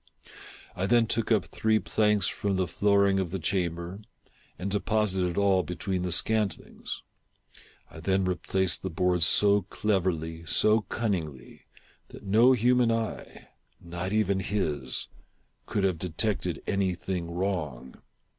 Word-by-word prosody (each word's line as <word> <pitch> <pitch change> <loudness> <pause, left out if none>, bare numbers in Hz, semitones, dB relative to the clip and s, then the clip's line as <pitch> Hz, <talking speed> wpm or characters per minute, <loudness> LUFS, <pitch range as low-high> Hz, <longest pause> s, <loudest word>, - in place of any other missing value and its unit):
I 95 - -1
then 120 0 +4
took 115 0 -2
up 105 -4 +3
three 110 0 +1
planks 105 -2 +1
from 100 -1 -2
the 95 0 +1
flooring 100 +1 +2
of 95 -3 -2
the 95 - -3
chamber, 85 +1 -2 0.6
and 95 +2 -4
deposited 95 -3 +1
all 100 -2 +3
between 90 +1 -3
the 90 0 -2
scantlings. 105 +1 -1 0.9
I - - -11
then 95 +2 0
replaced 90 0 0
the 95 - -3
boards 90 -1 +2
so 100 +1 +4
cleverly, 85 -5 -1
so 110 +1 +4
cunningly, 80 - -4 0.4
that - - -13
no 110 +6 +5
human 125 0 +3
eye 115 -1 -4 0.2
— - - -42
not 85 +2 -5
even 105 -2 +1
his 75 -10 -2 0.3
— - - -44
could 100 - -1
have 95 -4 0
detected 90 +1 -2
any 95 -2 0
thing 90 -1 -4
wrong. 85 -8 -4
95 Hz, 135 wpm, -27 LUFS, 85-105 Hz, 0.9 s, no